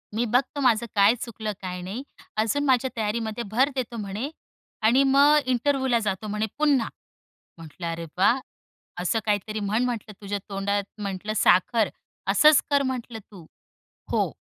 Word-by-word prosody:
मी 235 +2 +1
बघतो 270 +3 +1
माझं 235 -3 +3
काय 205 +3 +5
चुकलं 220 -2 -4
काय 180 -1 -5
नाही. 200 +9 -5 0.3
अजून 225 +7 +1
माझ्या 260 -1 +3
तयारीमध्ये 220 +1 -2
भर 260 +6 +3
देतो," 245 -2 -3
म्हणे 210 +5 -4 0.5
"आणि 240 +5 +4
मग 290 +2 +6
इंटरव्ह्यूला 260 -1 +1
जातो" 195 +2 -2
म्हणे 210 +1 -1
पुन्हा. 285 -6 +2 0.7
म्हटलं, 165 +2 -8
अरे 165 0 -5
वाह! 235 +7 +4 0.6
असं 185 +5 +1
काहीतरी 215 0 -1
म्हण 210 +4 0
म्हटलं, 225 -3 -4
"तुझ्या 200 0 -3
तोंडात 200 +1 -1 0.2
म्हटलं 200 +1 -3
साखर. 195 +3 +3 0.4
असंच 275 +10 +6
कर" 285 -1 +3
म्हटलं 240 -3 -6
तू. 180 -5 -12 0.7
हो - - +1
220 Hz, 145 wpm, -25 LUFS, 200-255 Hz, 0.7 s, मग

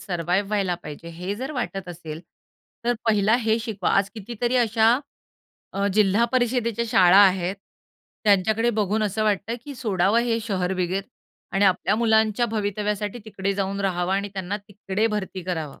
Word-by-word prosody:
Survive 180 +2 -1
व्हायला 200 -4 0
पाहिजे, 150 +3 -9
हे 180 +4 -5
जर 265 +6 -5
वाटत 195 -8 -4
असेल 160 -2 -7 0.6
तर 240 +1 +2
पहिला 210 0 +3
हे 225 -2 +1
शिकवा. 220 -5 -2
आज 195 0 +2
कितीतरी 235 +3 -2
अशा 230 0 +4 0.7
अ, 200 +1 0
जिल्हा 210 +2 +4
परिषदेच्या 235 -2 +1
शाळा 185 -3 +6
आहेत. 190 -1 +4 0.7
त्यांच्याकडे 215 +3 +3
बघून 210 +1 +1
असं 210 +1 -1
वाटतं, 210 +2 0
की 285 - -7
सोडावं 205 -2 +1
हे 230 -1 +1
शहर 190 -4 -1
वगैरे 185 +1 -1 0.5
आणि 195 +1 +2
आपल्या 185 +1 +2
मुलांच्या 220 0 +2
भवितव्यासाठी 210 0 -2
तिकडे 200 -2 -2
जाऊन 195 0 -2
राहावं 180 -2 0
आणि 200 +1 -1
त्यांना 190 +1 -3
तिकडे 205 +1 -1
भरती 205 -4 -3
करावं. 160 -5 -4
205 Hz, 150 wpm, -24 LUFS, 190-220 Hz, 0.7 s, शाळा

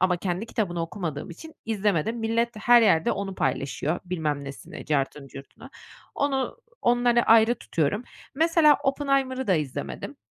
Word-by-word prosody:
ama 180 -1 +3
kendi 185 +4 -3
kitabını 175 -7 -2
okumadığım 165 -3 -5
için 320 - -11
izlemedim. 210 -1 0
Millet 230 +1 -1
her 240 +2 +6
yerde 165 -7 +3
onu 195 -1 -4
paylaşıyor, 140 +4 -2
bilmem 155 -5 -2
nesini, 140 0 -9
cartını 140 -1 -1
curtunu. 135 +1 -12 0.4
Onu, 280 - -1 0.2
onları 240 0 +3
ayrı 225 +1 +5
tutuyorum. 200 - -2 0.3
Mesela, 320 -1 +4
”Oppenheimer”ı 270 -2 0
da 190 - +3
izlemedim. 130 - -4
205 Hz, 135 wpm, -25 LUFS, 160-245 Hz, 0.4 s, her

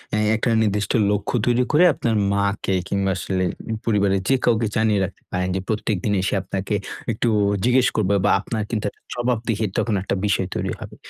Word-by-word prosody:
এ - - +1 0.2
একটা 115 +2 0
নির্দিষ্ট 105 -1 0 0.2
লক্ষ্য 105 +2 -1
তৈরি 125 0 +3
করে 155 +3 +5
আপনার 115 -4 -1 0.2
মাকে 100 -1 0
কিংবা, 100 -1 0
আসলে 95 0 -1 0.3
উ - - 0
পরিবারের 100 -3 +2
যে 135 - +5
কাউকে 115 -2 +2
জানিয়ে 110 -2 +2
রাখতে 95 - -11
পারেন। 90 0 -1
যে - - 0
প্রত্যেকদিন 105 -2 -1
এসে 95 - -1
আপনাকে 95 +2 -3 0.4
একটু 115 +2 0 0.3
জিজ্ঞেস 125 +1 +4
করবে 100 -2 +2
বা, - - +4
আপনার 110 +1 -3
কিন্তু 110 -3 -2
একটা - - -27
জবাবদিহির 115 -3 -1
তখন 115 -3 +1
একটা 100 - -2
বিষয় 95 -2 +1
তৈরি - - -2
হবে। - - -9
105 Hz, 185 wpm, -22 LUFS, 100-115 Hz, 0.4 s, করে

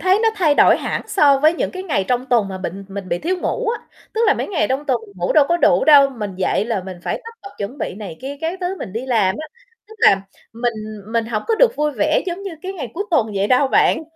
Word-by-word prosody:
thấy 375 +2 +3
nó 450 - +4
thay 320 -8 +2
đổi - - +6
hẳn - - -3
so 290 -9 +4
với 310 +4 +4
những - - -2
cái 370 0 -6
ngày 285 - -1
trong 250 +1 0
tuần 230 -6 +2
mà 190 -1 -6
bịnh 190 +2 -6
mình 195 -1 -7
bị 175 - -1
thiếu 365 +2 -1
ngủ 360 - -2
á, 470 - -1 0.3
tức 445 - -1
là - - +4
mấy - - -4
ngày 305 - 0
trong 270 +3 -1
tuần 250 -4 +1
mình 200 -2 -18
ngủ 175 0 -1
đâu 300 -3 +6
có 345 - +3
đủ - - +3
đâu, 285 -3 +7
mình 210 -6 -6
dậy 190 +2 0
là 220 -5 -2
mình 185 -2 -7
phải - - -3
tất 460 - -8
bật 395 - -9
chuẩn 220 +8 -5
bị - - -3
này 195 -6 -8
kia 275 +2 -6
các 335 +3 -3
thứ 365 +2 -2
mình 185 - -7
đi 245 +4 -4
làm 215 -7 +2
á, 310 - -6 0.4
tức 440 - -13
là 195 - +5 0.3
mình 235 +1 -1 0.4
mình 230 -1 0
hổng 215 -3 -2
có 450 - +3
được 475 +2 +3
vui 300 0 +1
vẻ 305 +3 +1
giống 360 +2 -4
như 395 - -5
cái 380 +1 -4
ngày 280 - -6
cuối 405 +4 -2
tuần 225 -9 +2
vậy 195 +1 +1
đâu 260 +3 +3
bạn, 320 - +3
270 Hz, 280 wpm, -19 LUFS, 210-345 Hz, 0.4 s, đâu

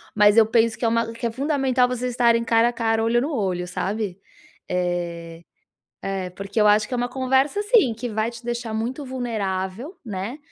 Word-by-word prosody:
mas 210 +1 +5
eu 225 - +8
penso 225 0 +2
que - - -2
é - - +4
uma 230 0 +1
que 230 - -6
é 230 - 0
fundamental 265 -1 +1
vocês 250 0 -2
estarem 235 -1 +3
cara 230 0 +3
a - - -5
cara, 225 -1 0
olho 235 +1 +2
no 295 +4 -2
olho, 185 -7 -1
sabe, 195 +1 -3 0.5
Eh, 170 -2 -3 0.6
é 190 -2 -3
porque 200 +4 -3
eu 210 - +5
acho 210 +1 +4
que - - -3
é - - +1
uma 245 0 -1
conversa 265 +7 +1
assim, 415 - +4
que 235 +3 -5
vai 220 +1 -1
te 235 0 -12
deixar 235 -1 -3
muito 245 +6 -3
vulnerável, 230 - -3
né, 210 +4 -5
230 Hz, 200 wpm, -23 LUFS, 200-250 Hz, 0.6 s, eu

